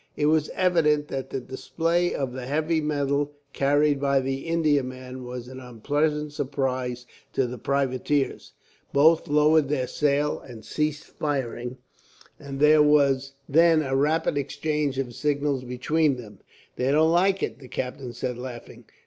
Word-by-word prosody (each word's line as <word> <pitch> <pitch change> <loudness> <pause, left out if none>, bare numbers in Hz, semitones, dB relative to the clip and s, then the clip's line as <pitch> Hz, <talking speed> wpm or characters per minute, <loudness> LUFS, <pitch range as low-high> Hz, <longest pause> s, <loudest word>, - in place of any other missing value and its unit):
It 150 - +1
was 155 0 +2
evident 150 -5 +2
that 135 -1 -4
the 135 - -3
display 165 +7 -1
of 135 -3 -2
the 125 -1 -6
heavy 155 +3 0
metal 145 -1 -1 0.2
carried 145 +1 +2
by 140 -1 +2
the 135 +3 -3
Indiaman 130 -6 -1
was 125 0 -7
an 130 +1 -9
unpleasant 145 +5 -1
surprise 130 -3 -2 0.3
to 135 - +1
the 125 0 -6
privateers. 140 +1 -1 0.4
Both 160 +4 +4
lowered 150 0 +4 0.2
sail 145 0 +1
and 115 -4 -12
ceased 150 0 -2
firing, 130 -4 -3 0.6
and 135 -1 -7
there 150 +1 +6
was 140 -2 +3
then 165 +1 +4
a 135 -1 -1
rapid 150 +1 +1
exchange 145 0 -2
of 130 -3 -3
signals 140 0 -1
between 140 +4 +1
them. 105 -5 -11 0.4
"They 130 +2 +1
don't 160 +2 +4
like 190 +3 +2
it," - - -3
the 130 - -12
captain 125 0 -5
said, 125 0 -4
laughing. 125 -2 -9
140 Hz, 145 wpm, -25 LUFS, 130-150 Hz, 0.6 s, there